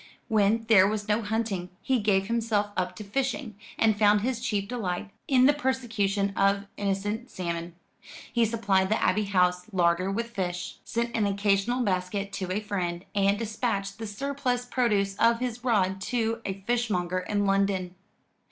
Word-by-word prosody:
When 220 +1 +3
there 195 -4 +7
was 210 0 -2
no 210 +2 +2
hunting, 210 -4 -2
he 260 -2 +1
gave 200 -2 +2
himself 220 -2 0
up 180 -1 -2
to 215 - -7
fishing, 255 +1 -2 0.2
and 220 -1 +3
found 210 -1 +5
his 245 +1 -1
chief 205 -5 -1
delight 200 -4 -3 0.2
in 255 -2 +5
the 285 - +6
persecution 225 -8 0
of 200 0 +2
innocent 205 +4 -2
salmon. 170 -1 -4 0.6
He 235 - +3
supplied 200 -4 +1
the 215 - +2
Abbey 210 +3 +2
House 180 -2 +1
larder 180 0 +2
with 230 +4 -2
fish, 180 -4 -4
sent 235 0 -2
an 210 -2 +2
occasional 200 +5 +1
basket 195 0 -2
to 185 -1 -3
a 205 +3 -1
friend, 180 -4 -3
and 200 0 +2
dispatched 215 -2 -2
the 225 - -4
surplus 250 +2 -2
produce 210 -6 +1
of 230 0 +4
his 245 -1 -3
rod 195 -6 +1
to 230 +1 -1
a 195 0 -4
fishmonger 195 -6 0
in 205 +2 -1
London. 195 -2 +1
205 Hz, 160 wpm, -27 LUFS, 195-230 Hz, 0.6 s, there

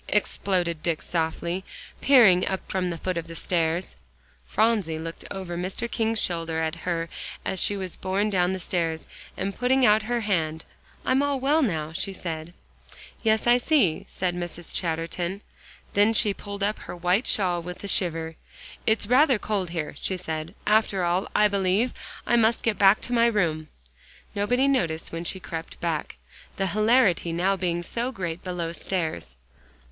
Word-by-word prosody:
exploded 180 -5 0
Dick 165 -1 0
softly, 170 +2 -2 0.4
peering 220 -10 +6
up 190 - -1
from 185 -1 0
the 170 - -3
foot 185 +2 -3
of 165 - -8
the 165 - -8
stairs. 170 +1 -1 0.5
Phronsie 190 - +1
looked 165 +1 -7
over 190 -3 -5
Mr. 185 +6 -2
King's 225 -1 +1
shoulder 165 -3 0
at 160 -1 -1
her 170 0 -2 0.4
as 190 - -1
she 205 - +2
was 185 -3 -4
borne 200 +3 0
down 180 -1 +2
the 190 - -3
stairs, 165 -2 -2 0.3
and, 195 +1 -2
putting 255 +1 +3
out 215 0 +5
her 240 +2 -1
hand, 160 -6 -1 0.4
"I'm 260 +2 +3
all 285 -1 0
well 290 +5 +3
now," 160 - -1
she 195 +3 -1
said. 165 -3 -5 0.7
"Yes, 220 -1 +2
I 240 +1 +5
see," 245 - +2
said 180 -1 -1
Mrs. 175 -1 -4
Chatterton. 170 +3 -2 0.5
Then 205 +2 +4
she 210 -2 +4
pulled 200 0 -6
up 210 +1 0
her - - -8
white 180 +6 +1
shawl 180 -4 +2
with 180 +3 -8
a - - -4
shiver. 165 -4 0 0.5
"It's 220 -1 +2
rather 255 +3 +5
cold 205 -4 -2
here," 165 -3 -3
she 190 - 0
said; 160 +1 -5
"after 210 -3 +2
all, 175 +3 +1
I 210 - +6
believe 200 +4 +1 0.3
I 240 - +3
must 230 0 +3
get 225 -3 0
back 195 +1 +6
to 245 - -4
my 235 -1 +5
room." 165 -8 0 0.7
Nobody 245 +6 +2
noticed 170 -13 0
when 165 +1 -5
she 190 - -2
crept 165 -2 -7
back, 165 -3 -2 0.4
the 195 - 0
hilarity 215 -5 +3
now 180 +4 +1
being 175 -2 -1
so 240 +8 -2
great 175 -7 -4
below 175 -2 -3
stairs. 160 - -3
185 Hz, 170 wpm, -26 LUFS, 170-215 Hz, 0.7 s, peering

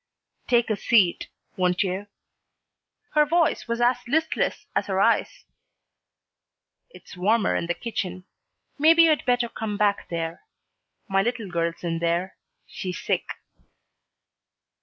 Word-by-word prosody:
"Take 240 -2 +2
a - - +2
seat, 200 -3 +2 0.3
won't 180 +1 +1
you?" 190 +2 -3 1.1
Her 300 -1 +5
voice 330 -1 +1
was 235 0 -2
as 240 +1 +3
listless 320 +5 0
as - - 0
her - - -1
eyes. - - +1 1.4
"It's - - -14
warmer 205 +4 +2
in 170 - -2
the 170 - -1
kitchen. 185 -6 -4 0.6
Maybe 325 +3 +7
you'd 315 -2 +3
better 245 -1 +2
come 220 -3 -5
back 205 -1 +1
there. 165 -1 -4 0.7
My 195 0 +2
little 230 0 -2
girl's 170 0 -2
in 165 -1 -2
there. 170 +3 -1 0.3
She's 180 -1 -6
sick." - - -1
205 Hz, 125 wpm, -25 LUFS, 180-245 Hz, 1.4 s, Maybe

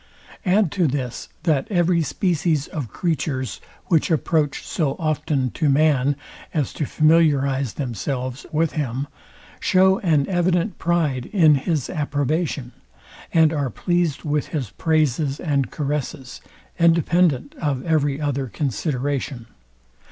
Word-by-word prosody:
Add 190 -2 +3
to 180 -5 +2
this, 130 -3 -4
that 155 -6 +1
every 175 -3 +2
species 160 -2 0
of 145 -6 -5
creatures, 140 - -2 0.2
which 165 -4 +2
approach 155 -2 0
so 150 -6 -1
often 150 -5 -1
to 155 -3 0
man, 140 -1 +3 0.4
as 145 -5 0
to 150 - -3
familiarize 140 -5 +3
themselves 130 +1 -4
with 160 0 +1
him, 135 -3 -2 0.5
show 190 0 +4
an 155 -7 +2
evident 180 +2 0
pride 155 -7 0
in 165 -7 +5
his 145 0 0
approbation, 145 -2 -2 0.6
and 160 -1 +4
are 145 -4 -1
pleased 175 - -1
with 150 -1 -1
his 130 -10 -4
praises 150 -3 0
and 140 -5 0
caresses, 140 -3 -4 0.4
independent 165 -4 +3
of 140 -5 -1
every 145 -4 +1
other 140 -3 -1
consideration. 135 - -2
150 Hz, 120 wpm, -22 LUFS, 135-165 Hz, 0.6 s, in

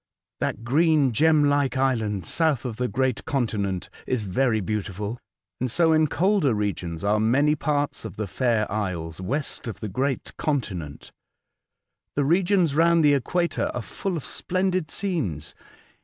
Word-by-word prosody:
That 115 - -2
green 150 +1 +3
gem 155 +5 +4
like 145 -3 +2
island 110 -8 0
south 155 - +1
of 115 -3 -4
the 125 - 0
great 130 -1 -1
continent* 110 - -1 0.2
is 125 -4 0
very 110 +4 +1
beautiful, 105 +2 -3 0.4
and 130 - -1
so 165 +6 +3
in 155 0 +4
colder 180 - +2
regions 90 -5 -3
are 105 +1 +2
many 135 +7 +3
parts 145 -1 -1
of 110 -4 -7
the 110 - -2
fair 115 +2 +1
isles 90 -5 -3
west 135 +7 -2
of 115 - -5
the 110 - -4
great 130 +6 -2
continent. 95 - -3 1.0
The 145 - +1
regions 175 0 +3
round 165 +1 +4
the 145 - +6
equator 170 +6 0
are 120 - -3
full 190 - -3
of 150 - -6
splendid 185 -3 -1
scenes. 135 - -3
130 Hz, 150 wpm, -25 LUFS, 105-155 Hz, 1.0 s, the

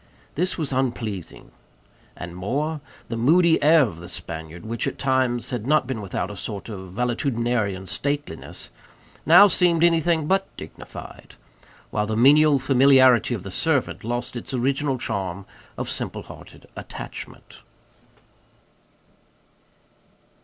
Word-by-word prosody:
This 180 +4 -1
was 150 -5 -2
unpleasing. 120 -8 -3 0.7
And 85 0 -7
more; 145 - -2 0.3
the 115 - -3
moody 160 +8 +4
air 155 +1 +6
of 95 -10 -4
the 90 +1 -9
Spaniard, 85 -1 -7
which 115 +1 -3
at - - -4
times 130 -2 0
had 120 -2 -4
not 150 -2 +3
been 125 -4 -4
without 100 +1 -3
a - - -8
sort 100 +2 -6
of 95 -4 -8
valetudinarian 120 -4 -1
stateliness, 140 - -4 0.6
now 175 +6 +9
seemed 175 -3 +3
anything 165 -2 +3
but 190 +5 +1
dignified; - - -11 0.6
while 105 0 -1
the 110 0 -2
menial 145 +4 +6
familiarity 130 -2 +5
of 95 - -7
the 95 - -7
servant 150 - -1
lost 120 +2 -3
its 120 +3 -5
original 135 +2 0
charm 95 -4 -4 0.3
of - - -4
simple - - -4
hearted - - -14
attachment. - - -9
125 Hz, 125 wpm, -23 LUFS, 105-145 Hz, 0.7 s, now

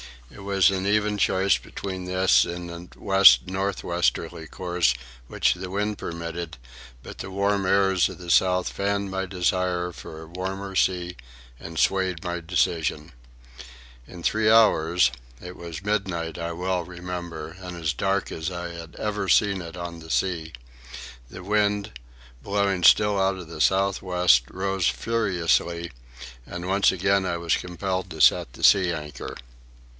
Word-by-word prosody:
It - - -13
was 100 -2 +3
an 95 0 -2
even 105 0 +1
choice 95 +1 +3
between 95 -2 -6
this 95 0 +4
and 85 0 -7
the - - -20
west 95 -12 +6
north 95 +1 -2
westerly 85 -1 -1
course 85 -7 0 0.3
which - - +1
the 90 +1 -7
wind 105 +2 -2
permitted; 85 0 -6 0.5
but - - -10
the - - -6
warm 100 0 0
airs 95 -2 +3
of - - -9
the 90 -2 -5
south 90 0 +3
fanned 100 0 -2
my 95 0 -2
desire 90 -1 0
for 80 -1 -10
a - - -12
warmer 95 +3 -5
sea 90 -1 0 0.4
and 80 -1 -9
swayed 95 -2 +1
my 90 -1 -3
decision. 80 -1 -1 1.0
In 90 -2 -11
three 110 +3 +2
hours—it 80 - +2
was 85 +1 -8
midnight, 90 -6 -2
I 85 0 -3
well 90 +1 -2
remember, 85 -2 -7
and 90 -2 -8
as 80 -2 -1
dark 95 +8 -1
as 80 +2 -3
I 85 -1 -5
had 85 -1 -10
ever 105 -3 -3
seen 100 -3 +3
it 85 +1 -9
on 85 -1 -6
the 80 0 -12
sea—the 60 -2 -5
wind, 105 0 +1
still - - -19 0.2
blowing 100 -3 +1 0.4
out 95 0 +1
of 90 -3 -9
the 80 -2 -6
south 95 0 +2
west, 90 -10 +3
rose 95 -1 -1
furiously, 85 -6 0 0.6
and 90 +1 -6
once 100 +1 +3
again 95 +1 +1
I 85 -2 -1
was 85 -1 +1
compelled 95 +1 -4
to 80 -1 -5
set - - +4
the - - -11
sea 95 -3 +5
anchor. 75 -5 -6
90 Hz, 150 wpm, -25 LUFS, 85-95 Hz, 1.0 s, west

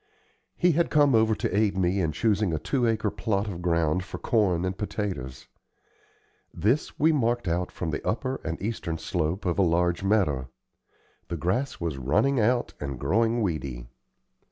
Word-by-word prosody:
He 180 0 +4
had 170 +2 +1
come 145 -3 +4
over 110 -1 +4
to 95 - -2
aid 100 -2 +2
me 95 +1 +1
in 80 -3 0
choosing 105 +1 +1
a 80 - 0
two 125 - 0
acre 110 -2 0
plot 105 -2 -1
of 90 -4 -5
ground 85 0 +1
for 95 - -7
corn 95 -6 +1
and 95 0 -2
potatoes. 95 - -4 1.0
This 110 - 0
we 160 +2 +5
marked 120 - 0
out 85 +2 -1
from 85 -3 -4
the - - -3
upper 130 +4 -2
and 80 - -4
eastern 95 -6 -3
slope 85 +3 -2
of 90 +1 0
a - - +6
large 85 0 +2
meadow. 80 -11 +1 0.8
The 85 - -4
grass 100 - -1
was 80 -5 -3
running 105 - +2
out 120 +3 +1
and 70 -3 -5
growing 115 - +1
weedy. 65 -9 -3
95 Hz, 170 wpm, -26 LUFS, 85-115 Hz, 1.0 s, a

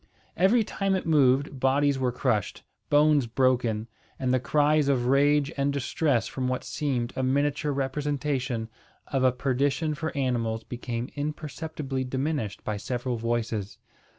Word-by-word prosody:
Every 210 +6 +4
time 195 -2 -1
it 190 - -2
moved, 140 -3 +3
bodies 135 +1 +2
were 125 -1 +1
crushed, 120 -5 -1 0.3
bones 145 -3 +4
broken, 120 -3 +1 0.3
and 130 -1 0
the 130 - +3
cries 150 +3 +2
of 130 -3 +2
rage 140 +2 +3
and 140 +1 +1
distress 140 -2 0
from 130 -1 -3
what 130 0 -2
seemed 130 -5 -2
a - - -1
miniature 145 +3 +1
representation 140 -3 -2 0.4
of 135 -2 0
a 130 - +5
perdition 140 +4 0
for 160 +1 -3
animals 115 -4 -1
became 120 0 -5
imperceptibly 150 -2 -4
diminished 130 -3 -2
by 105 -1 -2
several 120 +3 -3
voices. 115 -3 -2
135 Hz, 140 wpm, -27 LUFS, 125-145 Hz, 0.4 s, a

